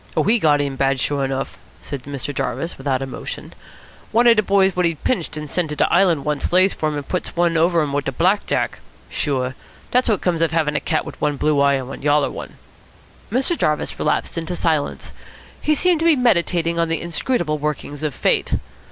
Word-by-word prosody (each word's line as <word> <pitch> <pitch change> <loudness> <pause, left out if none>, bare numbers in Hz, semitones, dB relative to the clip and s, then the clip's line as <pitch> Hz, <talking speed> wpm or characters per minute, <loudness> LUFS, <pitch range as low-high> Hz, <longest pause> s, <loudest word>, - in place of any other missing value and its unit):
"Oh, - - +4
he 225 +4 +3
got 150 -5 +3
in 140 -1 -4
bad, 135 0 +1
sure 140 +1 0
enough," 135 0 -3 0.2
said 140 -3 -6
Mr. 140 0 -5
Jarvis 165 +4 -3
without 135 -1 -1
emotion. 130 - -7 0.6
"One 235 +2 +3
of 235 -1 +7
de 215 - +4
boys 195 -2 +3
what 180 -1 +3
he'd 165 -3 -4
pinched 175 -10 -1
and 150 - -4
had 150 - -9
sent 175 -4 0
to 150 - -3
de - - +1
Island 175 -5 +3
once 150 -1 -1
lays 185 +2 +4
for 155 - -1
him 150 - -4
and 145 -1 -5
puts 180 - -3
one 170 -1 +2
over 165 0 +3
him 145 -2 -3
wit 140 0 -1
a - - 0
black 185 +9 +1
jack. - - -1 0.3
Sure. 130 -3 -1 0.4
Dat's 250 0 +2
what 210 -4 +1
comes 170 -3 0
of 165 - +3
havin' 155 -2 0
a - - +2
cat 155 - -1
wit - - -10
one 145 -1 0
blue 150 0 +2
eye 140 0 +4
and 130 -2 -3
one 135 - -8
yaller 145 0 +2
one." - - -8 0.8
Mr. 265 +9 +1
Jarvis 150 - -1
relapsed 150 +2 0
into 165 +2 -4
silence. 160 -4 -1 0.5
He 305 - +2
seemed 355 +2 +3
to 325 - 0
be 325 - +6
meditating 170 - +2
on 165 -1 +1
the 165 - 0
inscrutable 170 -2 -1
workings 145 -1 -4
of 150 -3 -2
Fate. - - +1
160 Hz, 220 wpm, -21 LUFS, 145-180 Hz, 0.8 s, of